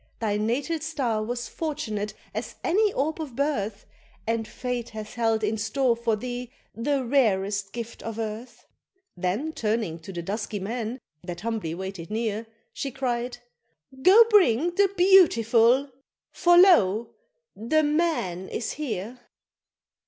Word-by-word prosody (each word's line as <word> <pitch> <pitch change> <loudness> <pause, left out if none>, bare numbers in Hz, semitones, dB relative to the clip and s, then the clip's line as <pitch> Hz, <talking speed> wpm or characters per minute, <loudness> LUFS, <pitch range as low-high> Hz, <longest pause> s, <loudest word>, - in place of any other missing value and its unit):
Thy 215 -3 0
natal 250 +10 -1
star 270 -9 -1
was 240 +1 -4
fortunate 215 -10 -4 0.2
as - - -5
any 415 +4 +3
orb 315 +4 -1
of 280 -6 -7
birth, 225 -8 -1 0.4
And 225 -1 -1
fate 245 -1 -4
hath 215 -1 -8
held 225 -2 +1
in 215 +1 0
store 235 +3 +1
for 230 -1 0
thee 245 +2 -5 0.2
the 265 +4 -1
rarest 200 -6 +1
gift 235 -1 -7
of 225 -1 -6
earth." 225 +2 -6 0.5
Then 195 - -2
turning 215 - -1
to 165 +4 -9
the 175 -2 -5
dusky 205 +2 -3
men, 230 +4 -4 0.2
that 175 -1 -6
humbly 215 -7 -3
waited 190 -2 -6
near, 220 0 -2 0.3
She 275 - -3
cried, 245 -2 -2 0.6
"Go 405 - +8
bring 345 - +4
the 395 +1 +3
BEAUTIFUL 270 - +5 0.4
for 350 0 +4
lo! 235 - +5 0.4
the 310 +9 +1
MAN 295 - 0
is 230 - -3
here!" 245 -5 -5
230 Hz, 135 wpm, -26 LUFS, 210-280 Hz, 0.6 s, Go